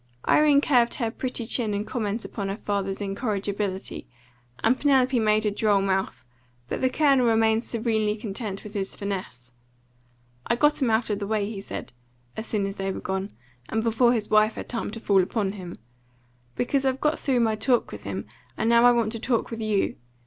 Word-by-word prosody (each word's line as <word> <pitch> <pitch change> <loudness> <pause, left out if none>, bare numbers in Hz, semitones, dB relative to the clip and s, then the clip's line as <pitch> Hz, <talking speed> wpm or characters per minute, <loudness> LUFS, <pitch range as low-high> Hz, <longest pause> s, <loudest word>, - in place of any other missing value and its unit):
Irene 295 -2 +5
curved 245 -5 +3
her 230 -4 -1
pretty 250 -1 -3
chin 225 -3 0
in 205 +1 -2
comment 220 -2 -3
upon 200 -3 -4
her 195 - -3
father's 200 -2 -2
incorrigibility, 200 -2 -3 0.6
and 230 +3 +4
Penelope 265 -3 +3
made 215 0 +2
a 210 - +2
droll 205 -1 +2
mouth, 190 -6 -1 0.4
but - - -3
the 260 - +3
Colonel 275 -3 +3
remained 225 0 +3
serenely 220 -3 0
content 210 -2 -5
with 210 - -10
his 195 -2 -3
finesse. 185 -12 -5 1.0
"I 235 - +2
got 295 +4 +2
'em 255 - +2
out 220 0 +1
of 205 - -1
the 200 - -4
way," 210 -1 0
he 205 -2 -6
said, 195 - -7 0.4
as 220 - -5
soon 205 -3 0
as 195 +1 -5
they 195 0 -2
were - - -5
gone, 190 +1 -3 0.4
and 220 0 0
before 230 +1 +3
his 215 -3 -2
wife 215 0 +4
had - - -6
time 235 - -3
to 225 +2 -7
fall 200 -3 +3
upon 195 +1 -1
him, 185 -4 -8 0.8
"because 270 +2 0
I've 265 0 0
got 300 +1 +1
through 255 -3 +1
my 225 -1 +2
talk 240 +3 +1
with - - -8
him, - - -4 0.3
and 225 - 0
now 235 +1 +5
I 245 - +8
want 230 -2 +1
to 230 - -5
talk 235 0 -1
with 225 0 -5
YOU. 215 -2 0
220 Hz, 200 wpm, -25 LUFS, 200-240 Hz, 1.0 s, I